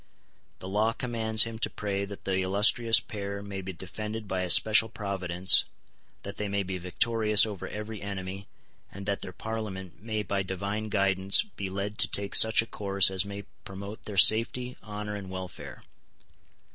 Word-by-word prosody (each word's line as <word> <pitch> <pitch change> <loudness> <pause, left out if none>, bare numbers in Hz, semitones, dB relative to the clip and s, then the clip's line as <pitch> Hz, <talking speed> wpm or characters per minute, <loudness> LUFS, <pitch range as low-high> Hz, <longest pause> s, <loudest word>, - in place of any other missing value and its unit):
The 95 - -9
law 105 +4 0
commands 110 -3 +3
him 115 -1 -6
to - - +1
pray 100 -1 -3
that 100 0 -11
the 95 -1 0
illustrious 105 +4 +4
pair 100 -1 -6
may 100 -1 -6
be 95 0 -6
defended 105 +4 -7
by 95 -1 -2
a 90 - -3
special 110 +4 +6
providence, 95 -3 +2 0.6
that 100 0 -8
they 105 - -3
may 100 0 -1
be 95 -1 -5
victorious 105 +4 +2
over 105 -4 -6
every 105 0 -7
enemy, 95 -1 -6 0.4
and 100 0 -9
that 100 -1 -2
their - - -6
Parliament 95 -5 -7
may 110 -1 -3
by 100 -1 -2
divine 100 +3 -4
guidance 95 -1 +3
be 100 - -7
led 100 +2 -5
to - - +4
take 100 0 -2
such 110 0 +6
a - - -10
course 100 -3 +3
as 95 0 0
may 100 0 -7 0.2
promote 100 +2 -9
their 105 -2 -7
safety, 120 +4 +4
honour, 105 0 -6
and 100 -2 -8
welfare. 95 -1 -8
100 Hz, 170 wpm, -28 LUFS, 95-110 Hz, 0.6 s, special